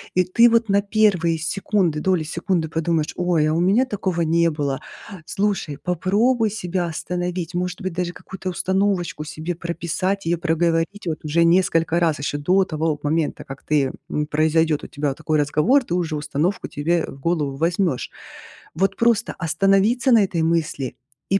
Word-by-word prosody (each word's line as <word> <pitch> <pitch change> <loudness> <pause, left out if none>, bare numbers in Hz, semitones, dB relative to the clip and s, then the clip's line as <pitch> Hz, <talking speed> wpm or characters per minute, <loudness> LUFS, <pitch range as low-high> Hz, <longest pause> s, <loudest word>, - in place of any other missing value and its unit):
и 185 - +4
ты 230 +7 +5
вот 230 -2 +2
на 200 +1 +3
1 200 -6 +2
секунды, 170 -1 0
доли 180 -1 +1
секунды 170 0 -2
подумаешь: 165 -1 -1
"Ой, 175 -4 +2
а 155 - +1
у 165 - +1
меня 200 +9 +3
такого 190 -7 -2
не 165 +1 +3
было". 145 -3 -2 0.5
Слушай, 195 -8 -2
попробуй 210 - +1
себя 185 -4 -2
остановить, 175 +1 -4
может 180 0 -3
быть, 185 -2 -3
даже 180 0 -2
какую-то 190 0 -9
установочку 185 -4 -1
себе 155 +3 -5
прописать, 175 +3 -2
её 170 +1 +1
проговорить 170 +4 0
вот 155 -1 -4
уже 165 +3 +2
несколько 170 -1 +3
раз. 160 -4 +1
Ещё 145 +1 -2
до 185 +7 +3
того 155 -3 -1
момента, 155 +1 -1
как 135 0 -10
ты 145 -3 +1 0.2
м, 150 - -1
произойдёт 155 0 +1
у - - -7
тебя 145 -1 -2
такой 155 +3 -1
разговор, 155 - +3
ты 175 - -5
уже 170 -3 -1
установку 150 +5 -2
тебе 165 +4 0
в 135 - -11
голову 145 -3 -1
возьмёшь. 170 -3 0 0.7
Вот 195 +3 +1
просто 230 -1 +2
остановиться 195 - +2
на 225 -3 +6
этой 170 -4 -1
мысли 160 -6 -1 0.3
и 195 - +3
170 Hz, 165 wpm, -22 LUFS, 155-190 Hz, 0.7 s, на